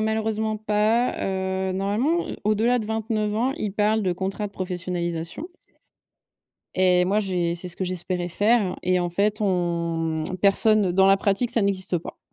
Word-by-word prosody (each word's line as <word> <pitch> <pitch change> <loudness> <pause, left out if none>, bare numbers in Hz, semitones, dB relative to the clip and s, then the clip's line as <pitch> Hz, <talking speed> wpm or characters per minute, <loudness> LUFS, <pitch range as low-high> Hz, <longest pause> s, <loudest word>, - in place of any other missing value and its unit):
malheureusement 220 0 -1
pas, 215 +3 +1
heu, 190 0 -2
normalement, 215 - 0
heu, - - -5
au-delà 220 +4 +2
de 215 - -4
29 220 -1 -1
ans, 245 +5 +1
il 205 -2 -3
parle 215 +1 +1
de 185 -2 +1
contrat 195 +3 -3
de 200 - -12
professionnalisation 175 - -4 1.3
et 180 -1 +4
moi 195 +3 +1
j'ai 180 -4 -1
c'est 175 +1 -5
ce 175 - -5
que 190 - -2
j'espérais 180 0 -3
faire 205 +1 +1
et 180 0 +2
en 175 - -1
fait 205 +4 0
on 170 -4 -1
mmh, 180 +4 -2
personne 200 0 +3
dans 190 +1 +4
la 195 0 +6
pratique, 200 +4 0
ça 225 - +2
n'existe 190 -3 0
pas. - - -10
195 Hz, 170 wpm, -24 LUFS, 180-215 Hz, 1.3 s, la